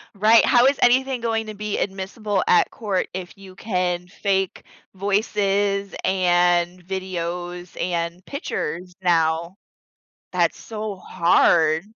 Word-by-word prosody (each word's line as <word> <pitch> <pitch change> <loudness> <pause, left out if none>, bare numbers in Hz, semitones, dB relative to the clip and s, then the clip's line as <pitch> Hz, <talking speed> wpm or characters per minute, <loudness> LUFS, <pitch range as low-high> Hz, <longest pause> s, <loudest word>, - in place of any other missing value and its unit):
Right, 220 +3 +5
how 240 +1 +5
is 275 +1 +3
anything 255 0 +3
going 225 -1 -1
to 215 - -6
be 210 0 -4
admissible 195 +1 -2
at 180 - +4
court 200 -5 -2
if 185 +1 -7
you 190 -1 -13
can 180 -4 -2
fake 195 0 -2 0.3
voices 200 0 0
and 175 -1 +2
videos 180 -1 -5
and 170 +1 -3
pictures 180 - -4
now? 170 0 +1 0.8
That's - - +1
so 215 -2 -5
hard. 165 -2 +3
190 Hz, 115 wpm, -22 LUFS, 175-210 Hz, 0.8 s, Right